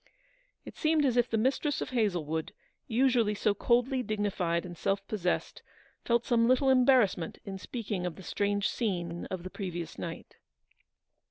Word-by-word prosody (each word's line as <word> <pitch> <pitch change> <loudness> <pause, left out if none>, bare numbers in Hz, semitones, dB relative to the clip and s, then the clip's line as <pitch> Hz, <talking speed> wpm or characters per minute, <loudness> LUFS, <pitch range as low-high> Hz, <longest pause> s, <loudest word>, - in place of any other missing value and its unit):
It - - -10
seemed 310 -1 +2
as 255 -3 +2
if 245 0 +3
the 225 - +1
mistress 270 +5 +1
of - - -4
Hazlewood, 175 -10 -1 0.3
usually 235 -3 +2
so 205 0 +2
coldly 245 +5 +2
dignified 200 -6 -1
and 175 -1 -8
self 195 +3 -1
possessed, 180 -5 -2 0.4
felt 235 0 +1
some 230 -2 +3
little 260 +2 +4
embarrassment 250 -10 +3
in 195 -1 -6
speaking 205 -4 -4
of 175 - -5
the 190 - -11
strange 205 +2 0
scene 175 -7 -2
of 185 -2 -5
the 185 - -7
previous 175 -5 -5
night. 165 -1 -7
210 Hz, 155 wpm, -30 LUFS, 180-245 Hz, 0.4 s, little